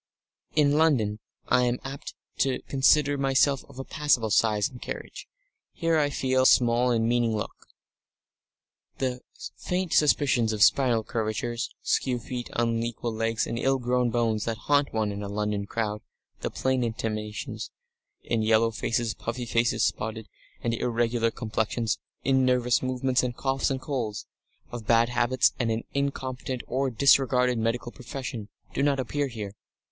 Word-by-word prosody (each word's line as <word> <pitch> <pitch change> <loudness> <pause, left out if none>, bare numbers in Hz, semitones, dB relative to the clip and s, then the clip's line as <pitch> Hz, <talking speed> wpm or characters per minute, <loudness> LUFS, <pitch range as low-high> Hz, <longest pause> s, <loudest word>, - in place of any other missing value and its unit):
In 150 -2 +4
London 115 -10 +2 0.3
I 125 0 +4
am 120 0 +1
apt 135 +1 -7 0.2
to 135 -2 +1
consider 140 +1 +3
myself 135 0 +2
of 140 - -14
a 135 - -4
passable 135 -7 +1
size 105 0 +3
and 125 -3 -13
carriage; - - -7 0.5
here 165 -1 +1
I 145 -1 +2
feel 130 -2 +2
small 120 0 +4
and 115 -2 +2
mean 120 -1 +2
looking. 105 - -3 1.4
The 125 -2 -2 0.4
faint 180 -1 -2
suspicions 130 -6 +3
of 105 -1 +3
spinal 120 -5 +4
curvatures, 115 +2 -2
skew 125 -2 +1
feet, 120 +1 -6
unequal 115 0 -1
legs, 115 0 0
and 115 - -3
ill 135 +2 +2
grown 125 -1 +1
bones, 115 -3 0
that 115 -1 -2
haunt 145 -1 +3
one 110 -2 0
in 100 0 -5
a 100 - -5
London 105 0 -2
crowd, 105 -2 -2 0.4
the - - -3
plain 130 -1 0
intimations 110 -2 -4 0.5
in 115 -2 0
yellow 110 +1 +3
faces, 115 +1 -1
puffy 120 +1 -5
faces, 115 0 +1
spotted 110 0 -2 0.4
and 115 - 0
irregular 115 0 +1
complexions, 110 0 -2 0.2
in 130 0 +3
nervous 125 -1 +2
movements 130 0 +1
and 125 -1 -3
coughs 135 0 0
and 135 -1 -2
colds 125 -7 -3 0.5
of 120 -3 -7
bad 115 0 +4
habits 120 +1 +2
and 120 -2 +1
an 110 0 -1
incompetent 130 -2 -3
or 135 +2 0
disregarded 125 0 +3
medical 115 +2 -1
profession, 125 -4 -6 0.2
do - - -1
not 140 -1 +2
appear 140 +3 -1
here. 105 -5 -6
120 Hz, 150 wpm, -27 LUFS, 115-130 Hz, 1.4 s, In